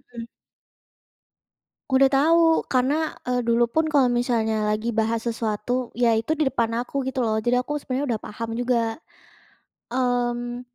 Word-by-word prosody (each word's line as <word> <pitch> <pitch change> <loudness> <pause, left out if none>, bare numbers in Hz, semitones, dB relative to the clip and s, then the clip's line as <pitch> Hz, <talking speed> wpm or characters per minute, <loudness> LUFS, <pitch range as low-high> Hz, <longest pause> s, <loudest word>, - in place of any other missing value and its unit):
Mmm. 230 - -6 1.7
Udah 265 +1 +5
tahu. 325 +4 +3
Karena, 260 +3 +2 0.3
eee, 250 -1 0
dulu 235 +1 +2
pun 315 +7 0
kalau 280 -4 +4
misalnya 235 -3 0
lagi 215 +2 -2
bahas 225 +1 0
sesuatu, 230 +2 -2
yaitu 230 +1 +2
di 305 - +2
depan 235 -4 0
aku 270 +3 -3
gitu 265 0 -3
loh. 225 -3 +1
Jadi 245 +1 +2
aku 290 +4 -3
sebenarnya 270 +1 -3
udah 215 - -7
paham 225 +2 -6
juga. 245 +1 0 1.2
Mmm 245 -1 -1
245 Hz, 140 wpm, -24 LUFS, 230-260 Hz, 1.7 s, Udah